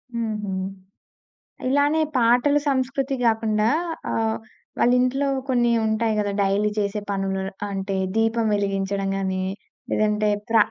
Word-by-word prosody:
హుహు. 215 Hz, -3 st, -2 dB, 1.2 s
ఇలానే 290 Hz, +3 st, +3 dB, 0.2 s
పాటలు 250 Hz, +5 st, +4 dB
సంస్కృతి 270 Hz, +1 st, 0 dB
కాకుండా 220 Hz, -1 st, +2 dB, 0.4 s
ఆహ్, 220 Hz, 0 st, 0 dB, 0.4 s
వాళ్ళింట్లో 255 Hz, +3 st, +3 dB, 0.2 s
కొన్ని 240 Hz, -2 st, +3 dB
ఉంటాయి 220 Hz, 0 st, +1 dB
గదా! 205 Hz, -1 st, 0 dB
డైలీ 200 Hz, +2 st, +2 dB
చేసే 205 Hz, +1 st, -1 dB
పనులు 195 Hz, -1 st, -1 dB, 0.3 s
అంటే, 195 Hz, 0 st, -2 dB, 0.2 s
దీపం 225 Hz, 0 st, +2 dB
వెలిగించడం 195 Hz, -1 st, -1 dB
గాని, 190 Hz, -1 st, -1 dB, 0.5 s
లేదంటే 210 Hz, 0 st, +1 dB, 0.2 s
ప్ర 230 Hz, -, +3 dB
220 Hz, 105 wpm, -23 LUFS, 200-245 Hz, 1.2 s, పాటలు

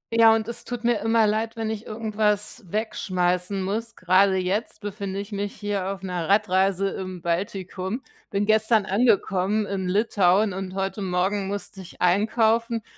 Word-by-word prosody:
Ja, 225 Hz, -1 st, +7 dB
und 220 Hz, -1 st, -2 dB
es 235 Hz, -, -5 dB
tut 245 Hz, -1 st, -6 dB
mir 235 Hz, -2 st, +2 dB
immer 225 Hz, +1 st, +3 dB
leid, 220 Hz, +2 st, 0 dB
wenn 220 Hz, -1 st, -2 dB
ich 220 Hz, 0 st, -6 dB
irgendwas 215 Hz, -1 st, -1 dB
wegschmeißen 185 Hz, -3 st, -1 dB
muss. 220 Hz, +4 st, -3 dB
Grade 190 Hz, +2 st, +3 dB
jetzt 190 Hz, +5 st, -2 dB
befinde 200 Hz, -1 st, -4 dB
ich 205 Hz, +2 st, -7 dB
mich 205 Hz, 0 st, -3 dB
hier 205 Hz, -2 st, -2 dB
auf 195 Hz, 0 st, -7 dB
'ner 180 Hz, -3 st, -3 dB
Radreise 195 Hz, -1 st, +2 dB
im 185 Hz, -3 st, -6 dB
Baltikum. 190 Hz, +5 st, -3 dB, 0.3 s
Bin 200 Hz, +1 st, 0 dB
gestern 220 Hz, 0 st, +3 dB
angekommen 205 Hz, -1 st, +2 dB
in 195 Hz, -2 st, -3 dB
Litauen, 200 Hz, -1 st, +3 dB
und 190 Hz, 0 st, -5 dB
heute 195 Hz, +2 st, -2 dB
Morgen 190 Hz, +2 st, 0 dB
musste 200 Hz, -1 st, -5 dB
ich 180 Hz, -, -13 dB
einkaufen, 225 Hz, +4 st, +2 dB
200 Hz, 155 wpm, -24 LUFS, 190-220 Hz, 0.3 s, Ja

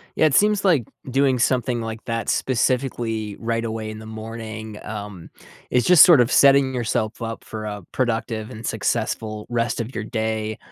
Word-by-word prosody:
Yeah, 155 Hz, -, +4 dB
it 145 Hz, -, +2 dB
seems 210 Hz, -1 st, +3 dB
like 160 Hz, -, +3 dB, 0.3 s
doing 135 Hz, -1 st, +2 dB
something 120 Hz, -1 st, +1 dB
like 115 Hz, 0 st, -6 dB
that 115 Hz, -2 st, -3 dB
specifically, 120 Hz, -4 st, -1 dB
right 115 Hz, 0 st, -2 dB
away 110 Hz, -1 st, -4 dB
in 110 Hz, -, -8 dB
the 110 Hz, -, -10 dB
morning, 110 Hz, -1 st, -7 dB
um, 105 Hz, -5 st, -7 dB, 0.4 s
is 125 Hz, -, +2 dB
just 180 Hz, -4 st, +9 dB
sort 165 Hz, -8 st, +7 dB
of 120 Hz, -, +3 dB
setting 140 Hz, -1 st, +5 dB
yourself 115 Hz, -1 st, -2 dB
up 115 Hz, 0 st, -5 dB
for 110 Hz, -1 st, -7 dB
a 105 Hz, -2 st, -5 dB
productive 115 Hz, -2 st, -2 dB
and 110 Hz, -2 st, -7 dB
successful 110 Hz, -1 st, -2 dB
rest 120 Hz, 0 st, -1 dB
of 115 Hz, +3 st, -5 dB
your -, -, -3 dB
day, 110 Hz, -2 st, -3 dB
115 Hz, 175 wpm, -22 LUFS, 110-125 Hz, 0.4 s, just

